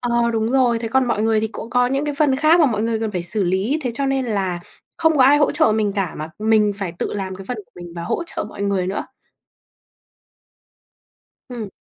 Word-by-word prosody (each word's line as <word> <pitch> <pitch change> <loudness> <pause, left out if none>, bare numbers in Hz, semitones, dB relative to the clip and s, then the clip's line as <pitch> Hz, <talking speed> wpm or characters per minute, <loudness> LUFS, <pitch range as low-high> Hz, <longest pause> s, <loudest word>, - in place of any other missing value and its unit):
Ờ, 235 -1 +1
đúng 225 0 0
rồi. 245 -3 +3
Thế 225 -1 -4
còn 265 +2 +2
mọi 215 -2 0
người 220 -1 +2
thì 220 - -1
cũng 230 +1 -8
có 245 0 +3
những 270 +3 -1
cái 295 -1 -2
phần 280 -2 +2
khác 315 +4 +4
mà 310 - +6
mọi 220 -4 0
người 225 -1 -1
cần 220 -1 -1
phải 180 - -2
xử 195 +4 -1
lý 190 - 0
thế 250 - -1
cho 275 +2 -1
nên 270 -1 0
là 190 -5 -1 0.4
không 320 -2 +2
có 265 - +6
ai 290 +2 +6
hỗ 290 - +3
trợ 300 -7 +3
mình 215 -2 0
cả, 195 -3 -2
mà 155 +1 -5
mình 215 -1 +3
phải 190 -4 -4
tự - - -3
làm 190 -2 -4
cái 195 - -9
phần 250 - -2
của 210 - -11
mình 175 -1 -10
và 170 - -4
hỗ 175 - -2
trợ - - -3
mọi 205 -1 -8
người 195 -2 0
nữa. 195 +2 -3 2.4
Ừm. 230 -5 -6
225 Hz, 245 wpm, -20 LUFS, 200-260 Hz, 2.4 s, mà